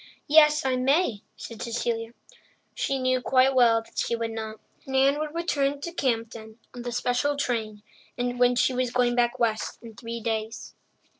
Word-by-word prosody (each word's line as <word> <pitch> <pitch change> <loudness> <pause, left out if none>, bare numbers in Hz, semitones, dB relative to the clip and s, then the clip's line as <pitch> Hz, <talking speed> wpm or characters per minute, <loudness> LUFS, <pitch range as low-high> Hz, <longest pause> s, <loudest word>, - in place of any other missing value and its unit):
"Yes, 300 0 +5
I 260 -1 +1
may," 260 - +1 0.2
said 230 -2 -9
Cecilia. 230 -1 -3 0.6
She 275 - -1
knew 255 -1 +1
quite 260 +1 +3
well 230 -3 +4
that - - -8
she 235 - 0
would 230 -1 -3
not. 220 -1 -6 0.3
Nan 270 +2 +3
would 305 +1 -4
return 285 -5 0
to 340 - -5
Campden 225 -7 -3 0.2
on 245 - -8
the 245 0 -5
special 250 +4 0
train, 220 -6 -2 0.3
and 245 0 +1
she 255 - +2
was 255 0 0
going 245 0 +1
back 240 +1 +1
west 225 -3 -1
in 230 -1 -10
three 235 0 -6
days. 220 0 -4
245 Hz, 165 wpm, -26 LUFS, 230-265 Hz, 0.6 s, Yes